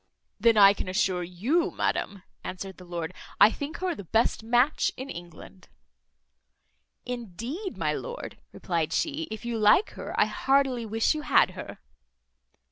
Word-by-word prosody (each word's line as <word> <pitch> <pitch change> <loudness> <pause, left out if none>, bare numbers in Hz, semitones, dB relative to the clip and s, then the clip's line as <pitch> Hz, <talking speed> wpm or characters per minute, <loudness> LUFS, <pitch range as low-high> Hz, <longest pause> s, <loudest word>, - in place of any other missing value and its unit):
"Then 225 +1 +4
I 200 -1 +8
can 200 - -5
assure 185 -2 +1
you, 210 - 0
madam," 200 -2 -2 0.2
answered 190 +1 -6
the 180 - -12
lord, 170 -1 -5 0.3
"I 205 +2 +8
think 290 +6 -5
her 370 -2 0
the 235 - -8
best 225 +7 +1
match 245 +6 +2
in 265 +2 -6
England." 165 - -11 1.4
"Indeed, 245 - -5
my - - 0
lord," - - -6
replied 165 -3 -2
she, 315 +1 -1
"if 220 +1 -7
you 235 -1 -2
like 215 - +5
her, - - -5
I - - +6
heartily 265 -4 +1
wish 225 +6 +2
you 305 - -4
had - - +4
her." - - -8
225 Hz, 150 wpm, -27 LUFS, 185-275 Hz, 1.4 s, I